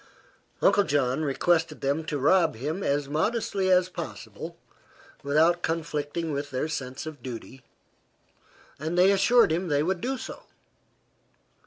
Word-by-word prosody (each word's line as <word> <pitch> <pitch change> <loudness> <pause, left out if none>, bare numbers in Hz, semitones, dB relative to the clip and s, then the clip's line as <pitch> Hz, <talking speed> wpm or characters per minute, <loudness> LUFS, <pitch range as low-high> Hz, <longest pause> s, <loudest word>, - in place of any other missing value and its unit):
Uncle 205 - +5
John 140 -4 0
requested 160 +2 +1
them 140 +4 0
to 150 - -2
rob 165 +3 +3
him 150 - -3
as 145 -4 0
modestly 190 +4 0
as 180 0 +4
possible 185 - -8 0.6
without 160 +5 +3
conflicting 160 0 -2
with 140 0 -3
their 130 +3 -2
sense 135 -2 -5
of 155 -4 -8
duty, 130 +1 -8 1.2
and 160 +4 -3
they 185 +2 +6
assured 200 +1 +4
him 175 +3 0
they 145 -2 +2
would 180 +1 -1
do 265 +2 -2
so. - - -8
155 Hz, 135 wpm, -27 LUFS, 140-180 Hz, 1.2 s, they